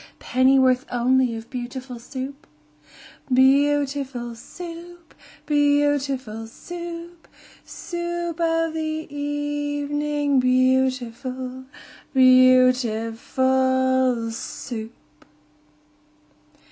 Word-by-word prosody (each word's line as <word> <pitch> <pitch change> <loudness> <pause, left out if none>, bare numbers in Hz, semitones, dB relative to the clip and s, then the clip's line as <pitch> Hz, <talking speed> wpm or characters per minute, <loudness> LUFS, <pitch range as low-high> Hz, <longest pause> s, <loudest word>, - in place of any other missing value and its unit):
Pennyworth 260 0 +3
only 245 0 +2
of 225 0 -9
beautiful 250 0 -6
Soup? 270 +3 -7 0.8
Beau 280 +3 +4
ootiful 265 -4 -5
Soo 295 +9 -11 0.3
oop! 345 -2 -22 0.3
Beau 290 -1 +3
ootiful 260 -6 -4
Soo 340 +6 -8
oop! 335 - -26 0.4
Soo 345 -1 -4
oop 330 - -12
of 330 -1 +1
the 320 - -3
e 315 0 -3
e 290 0 -3
evening, 290 -1 0
Beautiful, 255 0 0 0.5
beauti 255 -3 +5
FUL 260 -1 +1
SOUP! 225 -7 -8
260 Hz, 85 wpm, -23 LUFS, 255-290 Hz, 0.8 s, beauti